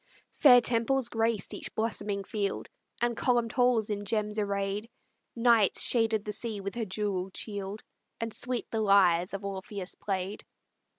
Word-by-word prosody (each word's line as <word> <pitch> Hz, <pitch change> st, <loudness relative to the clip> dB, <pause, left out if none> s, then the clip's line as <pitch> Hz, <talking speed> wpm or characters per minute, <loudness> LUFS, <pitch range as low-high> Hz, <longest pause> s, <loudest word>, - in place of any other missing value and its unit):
Fair 250 Hz, -4 st, +7 dB
temples 240 Hz, +2 st, +1 dB
graced 225 Hz, -3 st, -1 dB
each -, -, -6 dB
blossoming 205 Hz, -3 st, -2 dB
field, 200 Hz, 0 st, -3 dB, 0.3 s
And 240 Hz, 0 st, +1 dB
columned 240 Hz, -1 st, +1 dB
halls 245 Hz, -4 st, +2 dB
in 205 Hz, 0 st, -3 dB
gems 210 Hz, +1 st, -1 dB
arrayed; 200 Hz, +1 st, -2 dB, 0.5 s
Night 230 Hz, -3 st, +4 dB
shaded 225 Hz, -3 st, +2 dB
the 210 Hz, -, -3 dB
sea 215 Hz, 0 st, -3 dB
with 200 Hz, 0 st, -5 dB
her 235 Hz, -2 st, -3 dB
jewelled 190 Hz, -2 st, -3 dB
shield, 205 Hz, -1 st, -4 dB, 0.4 s
And 230 Hz, -1 st, -3 dB
sweet 245 Hz, -1 st, -1 dB
the 225 Hz, -, 0 dB
lyres 185 Hz, -4 st, +4 dB
of 200 Hz, 0 st, -6 dB
Orpheus 195 Hz, -1 st, -6 dB
played. 195 Hz, 0 st, -4 dB
210 Hz, 145 wpm, -29 LUFS, 200-230 Hz, 0.5 s, Fair